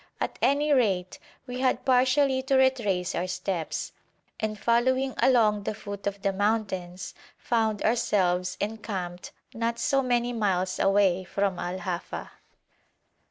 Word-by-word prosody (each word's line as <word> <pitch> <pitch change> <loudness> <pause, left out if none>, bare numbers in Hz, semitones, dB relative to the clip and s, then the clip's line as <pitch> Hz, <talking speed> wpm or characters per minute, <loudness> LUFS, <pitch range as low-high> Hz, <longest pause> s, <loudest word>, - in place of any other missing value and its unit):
At - - -3
any 290 +2 +3
rate, 195 -9 +1 0.3
we 250 -1 -6
had 260 -1 +1
partially 260 +1 +3
to 265 +1 0
retrace 210 -9 +2
our 180 - -1
steps, 180 -2 -3 0.5
and 215 -1 -2
following 260 +4 +2
along 220 -5 +4
the 205 - -3
foot 200 -2 -6
of 200 0 -4
the 195 - +1
mountains, 190 -3 -2 0.2
found 220 -3 0
ourselves 185 -5 +1
encamped 200 -5 -4 0.2
not 230 0 -1
so 275 +3 +2
many 245 -1 0
miles 190 -4 0
away 195 -2 +3
from 195 0 -1
Al 180 +1 -3
Hafa. 180 -2 -5
210 Hz, 130 wpm, -27 LUFS, 185-245 Hz, 0.5 s, along